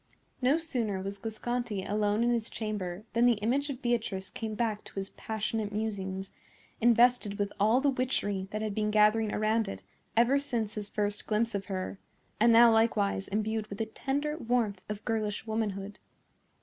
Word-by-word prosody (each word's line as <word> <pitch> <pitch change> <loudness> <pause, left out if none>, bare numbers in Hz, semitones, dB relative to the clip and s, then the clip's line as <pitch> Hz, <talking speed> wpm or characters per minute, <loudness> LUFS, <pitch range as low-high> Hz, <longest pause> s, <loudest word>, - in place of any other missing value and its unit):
No 260 +5 +4
sooner 240 -12 -1
was 195 +1 -5
Guasconti 225 -1 -3
alone 210 +1 +1
in 240 - +3
his 230 -2 0
chamber 205 -4 -4
than 235 +2 +4
the 245 - +6
image 255 +8 0
of 270 -1 -6
Beatrice 220 -6 -1
came 220 -1 -4
back 220 -2 -1
to - - -12
his 195 0 -4
passionate 220 -1 -3
musings, 195 -3 -3 0.5
invested 235 -3 +4
with 205 -1 -1
all 220 +6 +4
the 280 0 +3
witchery 205 -7 -1
that 215 +1 -3
had 215 -2 -2
been 210 0 0
gathering 215 0 +4
around 215 +1 +1
it 195 - -6 0.3
ever 245 +4 +5
since 235 -7 -2
his 210 -2 -5
first 205 -1 -2
glimpse 225 +2 +1
of 200 -1 -2
her, 190 0 -4 0.4
and 230 +2 +6
now 230 +1 +8
likewise 210 -3 +2
imbued 215 +1 -1
with 200 +1 -8
a 225 - 0
tender 285 +7 -2
warmth 225 -6 0
of 210 0 -5
girlish 215 -3 -1
womanhood. 205 -2 -3
215 Hz, 175 wpm, -30 LUFS, 205-235 Hz, 0.5 s, now